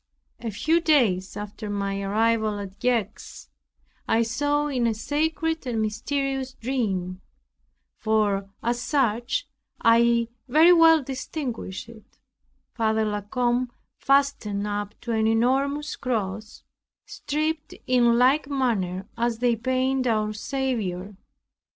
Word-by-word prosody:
A 230 - -4
few 315 - +1
days 220 - +2
after 210 +1 -6
my 200 -1 -2
arrival 215 +1 +1
at 200 0 -8
Gex, 245 -4 -2 0.6
I 230 - +3
saw 290 +6 0
in 255 -5 0
a 225 - 0
sacred 320 +4 -1
and 235 -3 -1
mysterious 265 +5 -2
dream 195 -7 -2 0.8
(for 205 -3 +1
as 240 +1 0
such 250 - 0 0.3
I 235 0 +4 0.2
very 315 +7 +6
well 325 -3 +6
distinguished 255 - -5
it) 230 -2 -16 0.6
Father 220 -1 +1
La 210 -1 -2
Combe 245 +3 0 0.3
fastened 275 -8 +1
up 205 0 -4
to 235 - -4
an 220 -1 +2
enormous 270 +6 +1
cross, 215 -4 -4 0.4
stripped 310 +1 -3
in 240 -2 +4
like 270 +4 +3
manner 205 -9 -1
as 235 -1 0
they 240 0 +2
paint 255 +2 0
our 215 -2 +1
Saviour. 210 -6 -3
235 Hz, 115 wpm, -25 LUFS, 210-270 Hz, 0.8 s, very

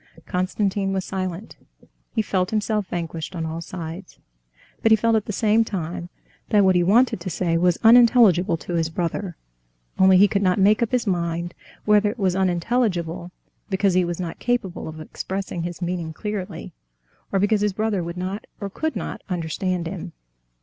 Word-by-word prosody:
Konstantin 195 +1 -1
was 190 -1 -2
silent. 185 +1 -5 0.6
He 220 - +2
felt 185 -2 0
himself 215 -2 -1
vanquished 165 -1 -5
on 165 -1 -3
all 160 +1 -4
sides, 170 +2 -8 0.6
but 225 - +3
he - - +9
felt 225 +1 +2
at 215 - +1
the - - -3
same 215 +2 +3
time 175 -4 -5 0.4
that 205 -3 +4
what 190 - +5
he 175 - +4
wanted 215 +6 +3
to 170 - -5
say 170 0 0
was 175 +1 +3
unintelligible 225 -7 +6
to 160 +3 -7
his 165 -1 0
brother. 175 +2 -3 0.6
Only 190 0 +7
he 200 +2 +7
could 200 -1 0
not 185 -2 +2
make 205 +3 +4
up 235 - 0
his 250 -2 +1
mind 170 -2 -1 0.3
whether 210 0 +4
it 225 - -6
was 190 -4 +1
unintelligible 180 -2 0 0.4
because 195 -1 +2
he 185 0 +3
was 175 0 -3
not 170 -3 -5
capable 240 -7 -2
of 155 0 -8
expressing 185 +3 -5
his 175 +1 -5
meaning 170 -2 -3
clearly, 205 +1 -5 0.6
or 195 - +1
because 205 +2 +2
his 210 -1 +1
brother 210 -3 -1
would 170 +1 -6
not 185 +3 -4
or 200 -2 -5
could 315 +9 -2
not - - -5
understand 180 +1 -2
him. 165 - -6
185 Hz, 175 wpm, -23 LUFS, 175-210 Hz, 0.6 s, he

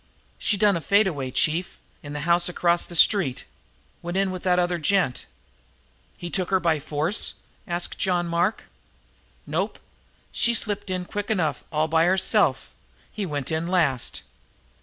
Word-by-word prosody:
"She 205 - +1
done 205 -1 +4
a 170 - -2
fade 200 +5 +3
away, 140 -8 -3
chief, 160 +7 0 0.2
in 145 0 -8
the 150 - -4
house 170 +2 +2
across 175 0 +1
the 175 - -7
street. 170 - +4 0.6
Went 175 +2 -4
in 195 -1 +1
with 185 -1 -6
that 180 -1 +2
other 175 -1 0
gent." 170 -5 0 0.9
"He 175 -1 -7
took 185 -2 0
her 190 -1 +3
by 165 -3 +1
force?" 155 +7 -1 0.3
asked 175 -1 -3
John 180 -2 +1
Mark. 170 +5 0 0.8
"Nope. - - -2 0.5
She 235 0 +2
slipped 205 -2 -2
in 185 -1 -3
quick 205 +3 -5
enough 180 -8 0
and - - -31
all 155 0 +1
by 160 +1 +3
herself. 190 +2 +2 0.4
He 205 -4 -4
went 145 -3 -3
in 160 +1 -1
last." 155 -9 +1
175 Hz, 160 wpm, -24 LUFS, 160-190 Hz, 0.9 s, done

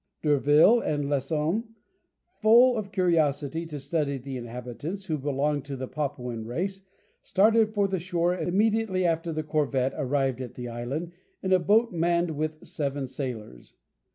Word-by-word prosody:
D'Urville 150 - +5
and 145 -8 -1
Lesson, 150 - 0 0.8
full 240 +3 +6
of 205 -3 -4
curiosity 165 -4 +1
to 150 -3 -6
study 140 0 -1
the 135 +1 -7
inhabitants, 125 - -6
who 155 -5 -2
belonged 145 +1 -1
to 140 -1 -5
the 130 0 -5
Papuan 125 -6 -4
race, 185 - -3 0.4
started 220 +2 +3
for 200 -1 +3
the 190 -1 -2
shore 175 0 0
immediately 200 +1 +1
after 165 0 0
the 155 0 -3
corvette 140 -4 0
arrived 135 -3 0
at 125 -3 -7
the 125 -1 -6
island 125 +9 -4 0.3
in 190 0 +2
a 185 - +5
boat 215 +6 +3
manned 170 0 +1
with 155 +1 -4
seven 140 -2 -3
sailors. 115 - -7
155 Hz, 150 wpm, -27 LUFS, 135-185 Hz, 0.8 s, full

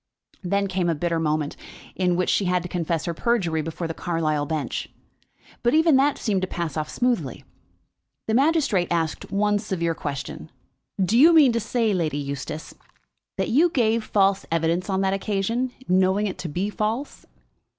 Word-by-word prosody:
Then 200 +2 +1
came 185 -2 -1
a 165 - +1
bitter 170 +2 -1
moment, 150 -2 -1 0.4
in 180 -2 +1
which 180 +1 +1
she 200 - +1
had 180 -1 +1
to - - -5
confess 170 -2 -2
her 170 - -2
perjury 175 -6 0
before 165 +2 -4
the 165 - -4
Carlisle 155 -4 -1
bench; 155 -2 -3 0.7
but 240 +4 +2
even 320 -2 +5
that 275 +1 +3
seemed 200 -5 0
to 185 - -1
pass 170 -5 -4
off 155 -1 -3
smoothly. 235 - -1 0.8
The 220 - -1
magistrate 270 - +2
asked 165 -1 -2
one 205 +1 +2
severe 170 -5 -1
question. 140 -3 -6 0.5
"Do 195 +5 +3
you 325 +5 +8
mean 295 -6 +7
to 230 - 0
say, 230 -1 0
Lady 160 -6 -1
Eustace, 140 +2 -5 0.6
that - - -1
you 315 +9 +4
gave 230 -7 +1
false 195 -2 +2
evidence 165 +3 0
on 190 0 +1
that 190 0 +1
occasion, 215 +5 -1 0.2
knowing 190 +3 +3
it 195 - -4
to 170 - -4
be 185 +7 -2
false?" 220 +7 -3
190 Hz, 170 wpm, -24 LUFS, 165-220 Hz, 0.8 s, you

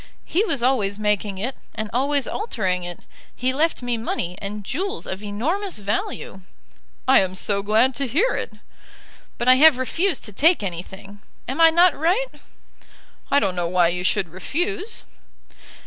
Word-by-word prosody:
"He 370 +6 +1
was 275 - -1
always 215 -6 +1
making 210 -1 -1
it, 245 +7 -3 0.2
and 215 - -3
always 275 +2 +1
altering 190 - -2
it. 175 0 -7 0.3
He 255 +1 -1
left 310 -1 0
me 245 -1 -1
money, 180 -5 -3
and 205 +1 -5
jewels 380 - -3
of 190 +1 -5
enormous 310 - -2
value." 200 -1 -3 0.7
"I - - +7
am 185 -1 -1
so 200 +1 +1
glad 220 +6 +3
to 275 -1 -2
hear 385 - +2
it." - - -3 0.9
"But 240 - -3
I 255 0 +7
have 305 -1 +7
refused 330 +8 0
to 210 - -9
take 320 - +3
anything. 195 +2 -7 0.3
Am 270 +6 -2
I 325 - +9
not 340 0 +5
right?" 370 +11 +1 1.0
"I - - +3
don't 195 -6 -1
know 175 -1 -1
why 175 -1 +3
you 180 +1 -2
should 190 -1 0
refuse." 355 - -4
235 Hz, 165 wpm, -22 LUFS, 195-320 Hz, 1.0 s, I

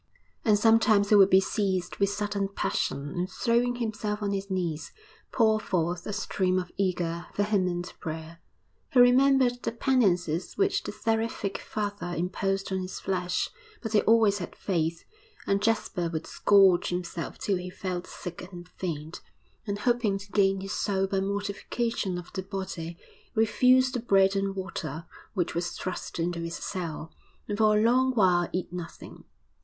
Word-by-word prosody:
And 210 -2 +4
sometimes 220 -2 +4
he 210 - +6
would 195 -1 +7
be 190 - +7
seized 190 -2 -1
with 200 -1 +2
sudden 205 -1 -1
passion 145 -7 -2
and, 180 +1 -1
throwing 240 +4 +1
himself 215 -3 -3
on 200 - 0
his 195 0 -3
knees, 170 -5 -3 0.4
pour 220 -2 +3
forth 175 -3 -1
a - - -2
stream 185 -2 0
of 180 -1 -3
eager, 175 -3 -1
vehement 185 -4 0
prayer. 160 0 -6 0.5
He 255 - +4
remembered 250 0 +5
the - - -2
penances 190 - +1
which 395 0 +2
the - - -5
seraphic 225 -3 -1
father 205 -4 -4
imposed 195 +3 -1
on 190 - 0
his 185 0 -5
flesh 180 -1 -1 0.3
but 225 -1 -4
he 210 - +5
always 220 -3 +4
had 175 - -6
faith; 165 -3 -1 0.4
and 200 0 +1
Jasper 210 -5 0
would 160 -1 -3
scourge 195 -3 +4
himself 175 -1 -4
till 195 -2 0
he 180 0 -6
felt 180 -1 -4
sick 180 +1 -8
and 175 -1 -10
faint, 160 -3 -5 0.5
and, 200 0 -1
hoping 225 -2 +1
to 200 +1 -11
gain 195 -1 +2
his 195 +1 -5
soul 195 -2 0
by 195 0 -1
mortification 200 +1 -2
of 175 0 -9
the 190 - -2
body, 185 -4 -5 0.4
refuse 255 +4 +4
the 250 - -2
bread 195 -4 +3
and 195 0 -1
water 165 -5 -5 0.3
which 180 -3 0
was 175 +1 -2
thrust 185 - -5
into 170 0 -1
his 170 0 -4
cell, 165 -4 -5 0.4
and 205 0 -3
for 215 -1 +5
a - - +3
long 255 +2 +3
while 180 -5 +3
eat 180 0 -3
nothing. 175 -2 -8
195 Hz, 160 wpm, -28 LUFS, 175-215 Hz, 0.5 s, would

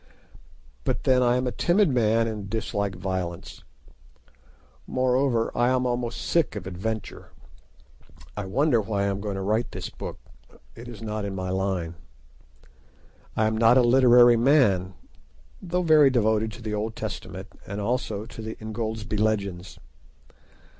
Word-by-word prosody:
But - - -2
then 130 -1 +3
I 120 0 +3
am 125 - -1
a 125 - -1
timid 175 - +2
man, 115 -3 +2
and 105 -3 -5
dislike 100 -3 -2
violence; 90 -2 -5 1.2
moreover, 130 -2 +1
I 120 +1 +2
am 130 0 +1
almost 120 -1 -2
sick 165 -9 +1
of 105 - -6
adventure. 95 +3 -5 1.1
I 105 - -4
wonder 120 +4 +2
why 100 -1 -2
I 100 - +1
am 100 0 -3
going 100 -1 -3
to 95 - -4
write 110 +4 -1
this - - -6
book: - - -7 0.6
it 115 +2 -10
is 115 -2 -9
not 105 -1 -3
in 100 -1 -4
my 95 -1 -3
line. 95 -3 -2 1.4
I 110 - +3
am 110 0 +1
not 115 +3 +5
a 130 - +5
literary 120 -1 +6
man, 115 -9 +3 0.7
though 180 0 -1
very 155 -4 +6
devoted 110 -3 +1
to 115 - -11
the 110 -1 -3
Old 110 +2 -3
Testament - - -6 0.2
and 100 +1 -5
also 110 -1 -2
to 115 0 -10
the 110 0 -6
"Ingoldsby 110 -1 -4
Legends." 100 -4 -1
110 Hz, 150 wpm, -25 LUFS, 100-125 Hz, 1.4 s, literary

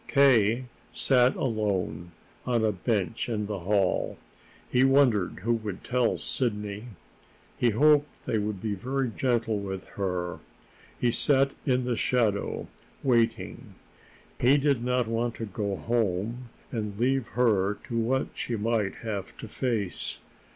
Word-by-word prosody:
K. 125 -4 +4 0.3
sat 125 -2 +3
alone 95 -8 -1 0.3
on 120 -3 +1
a 110 - +3
bench 105 +2 -1
in 105 -2 -1
the 100 -1 -4
hall. 95 +1 +1 0.5
He 125 +1 +3
wondered 130 -10 +3
who 120 +2 +2
would 110 -4 -4
tell 125 -1 +1
Sidney; 105 -3 -2 0.7
he 120 - +2
hoped 145 +6 +4 0.2
they 110 - 0
would 105 -1 -2
be 110 +1 -2
very 130 +4 -2
gentle 115 -4 +1
with 95 -1 -5
her. 90 -3 -3 0.6
He 120 - +2
sat 135 +3 +3 0.2
in 130 -1 +2
the 125 -1 0
shadow, 110 -5 0 0.4
waiting. 120 -4 0 0.6
He 130 +4 +5
did 140 -4 +1
not 125 -1 +1
want 115 +1 -1
to 115 - -4
go 100 -1 -3
home 115 +2 -1 0.2
and 105 -3 -4
leave 130 0 +1
her 105 -5 +3
to 115 - -2
what 130 +4 0
she 120 - -3
might 110 -2 0
have 100 -4 -4
to - - -8
face. 110 -6 -2
115 Hz, 135 wpm, -27 LUFS, 105-125 Hz, 0.7 s, He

